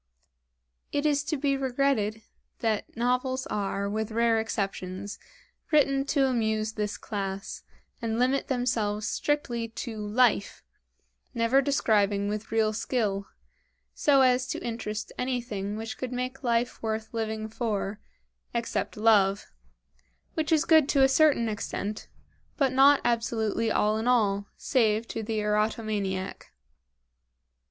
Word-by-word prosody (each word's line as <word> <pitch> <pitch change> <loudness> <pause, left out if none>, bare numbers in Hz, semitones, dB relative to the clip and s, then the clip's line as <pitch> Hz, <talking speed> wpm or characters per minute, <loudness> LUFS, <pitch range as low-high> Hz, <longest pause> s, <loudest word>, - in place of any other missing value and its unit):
It 285 +1 -1
is 290 -1 +2
to 305 +1 -1
be 275 0 +1
regretted 255 -5 0 0.3
that 220 0 -2
novels 255 +2 0
are, 200 -1 -1
with 215 +1 -2
rare 230 0 +2
exceptions, 195 -2 -4 0.5
written 275 -3 +3
to 280 -1 +2
amuse 220 -4 0
this 210 -1 -3
class, 195 -2 -5 0.4
and 225 -1 -1
limit 255 +3 +1
themselves 225 -5 0
strictly 245 -6 -1
to 225 0 -6
"life," 210 0 +1 0.7
never 235 +4 +3
describing 210 -8 +2
with 210 +1 -4
real 220 -1 +2
skill, 210 -3 -1 0.7
so 275 -2 +4
as 255 0 +3
to - - -4
interest 220 -2 -4
anything 235 -6 -2
which 225 +2 -6
would 255 -1 -3
make 255 +1 -4
life 240 0 0
worth 220 0 -3
living 220 -1 -2
for 215 -2 -3 0.6
except 235 -2 -2
love 205 -3 +3 0.8
which 310 0 -2
is 320 0 +4
good 315 -3 +5
to 275 -2 +4
a - - +7
certain 270 -4 +4
extent, 210 0 -4 0.5
but 275 -3 +2
not 275 +2 +6
absolutely 230 -1 0
all 215 +1 +2
in 225 - -2
all, 205 -5 +2
save 225 -3 +1
to 225 - -3
the 220 0 -3
eroto 210 +2 0
maniac. 195 -3 -3
225 Hz, 130 wpm, -27 LUFS, 210-255 Hz, 0.8 s, a